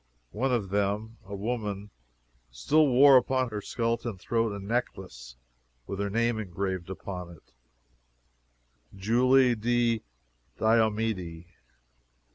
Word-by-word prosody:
One 130 +4 -1
of 110 -6 0
them, 105 +3 -1
a 100 +1 -7
woman, 105 -2 -4 0.6
still 145 - +2
wore 135 +1 +7
upon 130 0 +1
her 105 -2 -5
skeleton 115 -1 -2
throat 115 +4 -1
a 100 - -5
necklace, 95 - -4 0.5
with 100 - -6
her 100 0 -1
name 115 +2 0
engraved 95 -2 -4
upon 90 -2 -6
it 85 -3 -17 1.4
JULIE 125 +5 +4
DI 120 0 +1 0.6
DIOMEDE. 110 -6 0
110 Hz, 105 wpm, -28 LUFS, 95-120 Hz, 1.4 s, wore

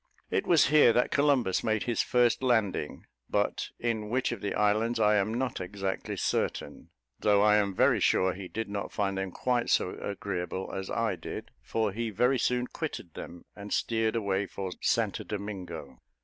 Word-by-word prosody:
It - - 0
was 165 -6 +5
here 145 -6 +6
that 125 - +2
Columbus 140 -9 +2
made 110 -1 +1
his 120 -2 0
first 120 0 +2
landing, 110 - 0 0.2
but - - 0
in 110 -3 -2
which 125 +3 0
of - - -5
the 100 - -2
islands 110 +3 +2
I 105 0 +4
am 100 +2 +1
not 125 -5 -2
exactly 95 +1 -4
certain; - - -2 0.3
though 105 -1 +4
I 105 0 +5
am 100 -2 0
very - - +4
sure 95 0 +3
he 95 -1 -7
did 115 +4 -4
not 100 0 -4
find 100 -1 -1
them 95 0 -2
quite 120 +6 -1
so 90 - +2
agreeable 95 -2 -4
as 95 0 -4
I 110 -4 0
did, - - -7
for 110 -2 -1
he 115 +3 -3
very 125 +5 +2
soon 125 +1 +1
quitted 125 - -6
them, 85 0 -9
and 100 0 -9
steered 115 -1 0
away 100 -3 0
for 95 -1 -5
St - - +1
Domingo. 95 -9 -6
105 Hz, 175 wpm, -29 LUFS, 95-120 Hz, 0.3 s, here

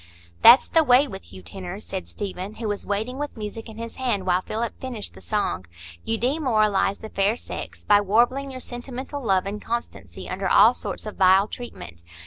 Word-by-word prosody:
"That's 240 +3 +9
the 325 - +4
way 260 +1 +5
with 195 -6 -10
you 95 -1 -11
tenors," 190 - -7
said 190 -1 -5
Stephen, 195 +1 -6
who 225 - -4
was 205 -1 -3
waiting 220 +6 -2
with 290 -3 -5
music 220 +1 -6
in 220 - -11
his 230 0 -7
hand 240 -8 -1
while 180 0 +2
Philip 225 +3 -3
finished 245 -5 -5
the - - -14
song. 95 - -2 0.4
"You 225 - -1
demoralise 220 -7 +1
the 220 - -9
fair 200 +2 +1
sex - - -8
by 205 0 +5
warbling 240 +7 +2
your 260 -1 -7
sentimental 260 +3 -6
love 190 -4 +2
and 205 +1 -5
constancy 235 +1 -5
under - - -2
all - - +7
sorts - - -3
of 215 - -7
vile 190 +1 +5
treatment. 85 - -9
215 Hz, 190 wpm, -24 LUFS, 195-245 Hz, 0.4 s, That's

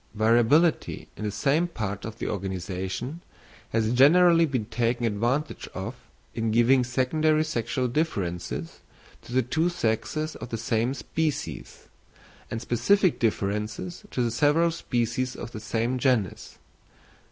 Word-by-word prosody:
Variability 120 +9 +3
in 105 - -5
the - - 0
same 140 - +1
parts 105 - -4
of 110 0 -8
the - - -4
organisation 95 - -4 0.5
has 110 0 +1
generally 165 +5 +6
been 130 -7 -2
taken 120 +1 0
advantage 120 +7 -1
of - - -4 0.4
in 115 0 -1
giving 120 +3 +4
secondary 155 +5 +2
sexual 125 -3 -1
differences 90 - -3 0.4
to - - -13
the 130 +1 +2
two 160 +8 +1
sexes 155 +1 -1
of 110 - -8
the 115 - -3
same 115 +3 0
species, 155 +1 -4 0.6
and 115 - -3
specific 175 - +2
differences 105 - -2
to 125 - -1
the 120 - 0
several 150 +7 +3
species 125 -3 -1
of - - -7
the 110 - -6
same 115 +4 -1
genus. 125 -8 0
120 Hz, 130 wpm, -26 LUFS, 110-150 Hz, 0.6 s, generally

